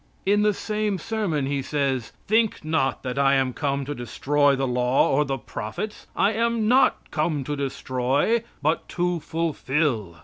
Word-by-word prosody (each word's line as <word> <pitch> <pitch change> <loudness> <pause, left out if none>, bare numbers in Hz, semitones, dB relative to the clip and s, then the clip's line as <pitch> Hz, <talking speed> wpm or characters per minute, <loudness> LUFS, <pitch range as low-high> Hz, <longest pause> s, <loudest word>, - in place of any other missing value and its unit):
In 205 +2 +3
the 210 0 +4
same 210 0 -2
sermon 200 -9 -1
he 140 0 -1
says: 135 -4 -1
"Think 220 -5 +1
not 155 -4 0
that 130 +1 -3
I 140 0 +4
am 130 -1 +1
come 140 -1 -1
to 145 - -3
destroy 140 +4 +1
the 135 0 -1
law 125 +1 +2
or 145 +2 +3
the 135 -1 -2
prophets. 115 - -6
I 210 - +2
am 230 0 +1
not 255 +4 +3
come 155 -2 0
to 145 +2 -3
destroy, 135 - 0 0.2
but 155 +3 0
to 175 -1 0
fulfill." 145 - -1
145 Hz, 165 wpm, -24 LUFS, 135-195 Hz, 0.2 s, the